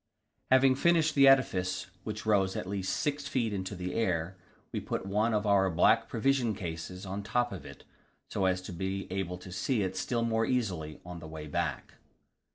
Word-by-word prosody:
Having 130 0 +5
finished 165 0 +3
the 140 -1 +6
edifice, 95 -9 +3 0.2
which 110 0 -5
rose 100 -3 +2
at - - -3
least 95 0 -2
6 145 -1 -1
feet 115 -6 0
into 95 0 -3
the 90 0 -4
air, 90 -5 0 0.4
we - - -2
put - - -4
one 105 +4 +1
of 105 -1 0
our 100 -2 +4
black 100 +7 +3
provision 120 -2 +1
cases 90 0 -6
on 100 +2 -4
the 100 - -12
top 120 0 +1
of - - -7
it, - - -12 0.4
so 95 - -1
as 90 0 +1
to 95 - -7
be 95 +3 -3
able 95 -2 -2
to 90 0 -11
see 105 +4 0
it 95 0 -3
still 115 +5 -1
more 115 -1 +1
easily 90 -12 -1
on 90 -1 -7
the 80 - -9
way 80 -1 -7
back. 75 - -3
100 Hz, 195 wpm, -30 LUFS, 90-115 Hz, 0.4 s, the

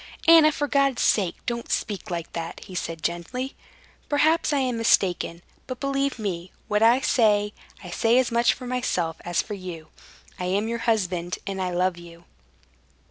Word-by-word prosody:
"Anna, 325 -2 +8
for 290 0 -2
God's 275 -3 +2
sake 185 -5 +2
don't 235 -1 -3
speak 210 -1 -2
like 170 -2 -5
that!" 165 0 -5
he 190 - -12
said 165 -2 -4
gently. 250 +11 -3 0.6
"Perhaps 310 +3 +3
I 290 - +2
am 255 -3 0
mistaken, 175 -6 +1 0.2
but 255 -1 -5
believe 275 -1 -1
me, 185 -5 -4 0.2
what 210 0 +1
I 235 +4 +5
say, 210 -6 +2 0.3
I 180 - -8
say 230 +6 +3
as 255 -2 +2
much 235 0 +3
for 250 - -9
myself 235 -10 -1
as 170 -1 0
for - - -7
you. 180 -5 -8 0.5
I 180 - -2
am 200 +4 0
your 235 0 -2
husband, 180 -5 0
and 195 -1 -3
I 185 - -1
love 180 0 0
you." 170 0 -13
210 Hz, 175 wpm, -25 LUFS, 175-250 Hz, 0.6 s, Anna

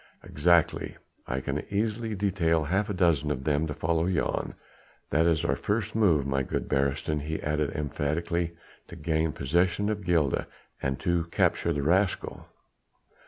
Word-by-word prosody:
"Exactly. 85 +2 +2 0.3
I 65 +1 -2
can 70 +3 -3
easily 110 +2 -1
detail 90 -5 +1
half 95 +8 0
a - - -1
dozen 80 -5 +2
of 65 -3 -2
them 75 +1 +1
to 75 - -3
follow 80 +2 0
Jan. 90 -3 -1 0.6
That 80 +3 +3
is 80 -1 +2
our - - +2
first 105 0 -2
move, 90 -11 +3
my 70 0 0
good 65 - -3
Beresteyn," 70 +2 0
he 80 +2 -3
added 75 -1 0
emphatically, 80 +4 -2 0.3
"to - - -10
gain 80 0 0
possession 85 +7 +1
of 105 -1 -2
Gilda, 85 -6 +1 0.3
and 65 0 -1
to 85 -3 +1
capture 85 0 +1
the 75 -3 -1
rascal. 90 +5 0
80 Hz, 155 wpm, -28 LUFS, 75-90 Hz, 0.6 s, That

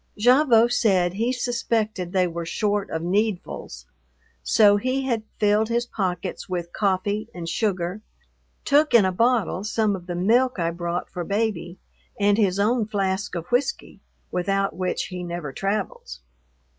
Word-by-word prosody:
Gavotte 240 0 +5
said 185 -6 +2
he 230 +5 0
suspected 225 -7 -1
they 185 -1 +2
were 170 -1 -4
short 205 +4 -1
of 160 0 -3
"needfuls," 180 - -2 0.6
so 205 - +5
he 255 +5 -1
had 235 -4 0 0.2
filled 210 +1 +2
his 235 +1 0
pockets 190 -4 -4
with 175 -2 -4
coffee 205 +2 -1
and 170 -2 -6
sugar, 190 0 -1 0.6
took 295 -1 +3
in 215 -5 +7
a 185 - +1
bottle 230 -2 +1
some 215 -1 0
of 180 -1 -10
the 175 - -3
milk 235 +8 +2
I 170 -1 0
brought 170 +1 -3
for 175 - -5
Baby, 200 -3 -2 0.4
and 205 0 +4
his 195 -3 +2
own 220 +1 +2
flask 195 -2 -2
of 170 -1 -4
whiskey, 265 - -1 0.3
without 195 0 0
which 185 0 -1
he 180 -1 -6
never 170 -5 -5
travels. 195 - -3
200 Hz, 150 wpm, -24 LUFS, 180-225 Hz, 0.6 s, in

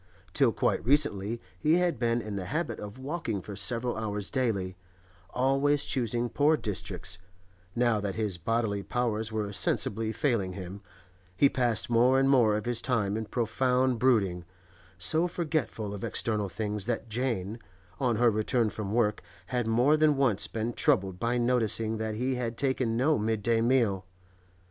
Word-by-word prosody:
Till - - +4
quite - - 0
recently 120 -5 +1 0.2
he 155 - +2
had 175 -7 +1
been 115 0 +1
in 105 -1 -5
the 95 -2 -4
habit 155 - -2
of 105 +2 -8
walking 130 - -3
for 100 +2 -8
several 115 +5 -1
hours 105 -2 -3
daily, 105 -9 -1 0.5
always 135 +5 +1
choosing 120 -2 -1
poor 150 +5 +2
districts; 90 - -3 0.6
now 120 -3 +2
that 100 -2 -3
his 105 -5 -2
bodily 110 +1 -1
powers 110 -1 -1
were 105 -2 -3
sensibly 110 +3 0
failing 110 -5 0
him, 95 +1 -8 0.6
he 140 - +5
passed 120 -4 +1
more 120 +3 +4
and 135 0 +3
more 115 -6 +4
of 105 - -5
his 120 -1 0
time 105 -6 0
in 110 0 -3
profound 125 +2 +1
brooding, 100 -9 +2 0.5
so 160 - +1
forgetful 155 - -2
of 100 - -7
external 105 -3 -1
things 105 +1 -3
that 115 -1 -2
Jane, 115 -3 -2 0.4
on 125 -4 +1
her 120 +1 +4
return 110 +1 +1
from 105 -1 -4
work, 105 -3 +1 0.3
had 120 -2 0
more 120 +7 +4
than 155 -2 +3
once 120 -8 +2
been 115 +1 -3
troubled 100 - +1
by 120 +3 0
noticing 115 -2 +1
that 110 0 -3
he 130 +4 -1
had 120 -2 -3
taken 130 -4 0
no 140 +2 +2
midday 115 +1 +1
meal. 115 -6 +1
115 Hz, 160 wpm, -28 LUFS, 105-130 Hz, 0.6 s, he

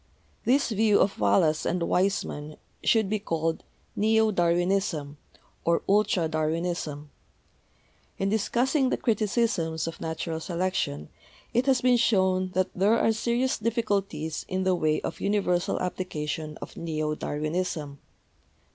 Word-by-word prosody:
This 270 +2 +3
view 215 -1 +3
of 195 - +1
Wallace 105 +10 +3
and 175 0 0
Weismann 170 -5 -1 0.3
should 220 -3 +3
be 215 +2 -1
called 165 -4 -2 0.3
'Neo 220 +1 +3
Darwinism' 175 -4 0 0.4
or 170 0 +1
'Ultra 195 -4 +3
Darwinism/ 155 -2 -2 1.1
In 195 - 0
dis 215 0 0
cussing 265 +2 +2
the - - 0
criticisms 215 -8 0
of 165 -1 -6
natural 160 0 -3
selection 170 - -2 0.4
it 245 +3 +1
has 260 -3 +3
been 250 -1 +4
shown 190 -5 +2
that 185 0 0
there 205 +5 +3
are 225 - +3
serious 240 +3 0
difficulties 205 -8 -1
in 185 0 -1
the 185 0 +2
way 155 -3 +1
of - - -5
universal 195 -3 +1
application 155 -4 -4
of - - -10
neo 155 -2 -2
Darwinism. 150 -1 -3
185 Hz, 130 wpm, -27 LUFS, 160-215 Hz, 1.1 s, been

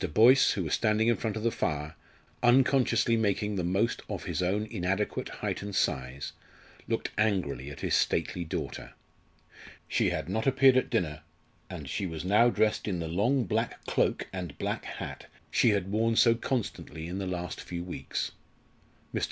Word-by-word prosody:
Boyce, 125 +5 +7
who 95 - -2
was 80 - -2
standing 110 0 +2
in 120 - +4
front 110 -1 -3
of 110 - -4
the 115 - +2
fire, 75 -3 -2 0.5
unconsciously 125 -1 +4
making 105 -1 0
the 90 - -1
most 100 +7 0
of - - -4
his - - -2
own 100 +4 0
inadequate 95 +1 -2
height - - -3
and 100 -1 -5
size, 65 +2 -1 0.5
looked - - -2
angrily 90 - 0
at 70 - -9
his - - -1
stately 90 - +1
daughter. 80 - -5 0.9
She - - +2
had - - -3
not 110 +4 -1
appeared 135 -1 +6
at 130 - +2
dinner, 75 -2 -1 0.5
and 70 - -7
she 95 +7 -2
was 80 0 -5
now 105 +5 +5
dressed 110 -2 +1
in 95 -4 -1
the 85 -1 -3
long 115 +11 +2
black 95 - -2
cloak - - 0
and 90 -7 -5
black - - -3
hat - - -7 0.2
she 120 - +4
had 100 -2 0
worn 115 +2 +2
so 115 0 +6
constantly 115 -9 -3
in 90 +3 -4
the 95 - -3
last 90 -2 -4
few 85 -1 -5
weeks. 90 - -4 0.8
Mr. - - 0
100 Hz, 175 wpm, -29 LUFS, 85-115 Hz, 0.9 s, Boyce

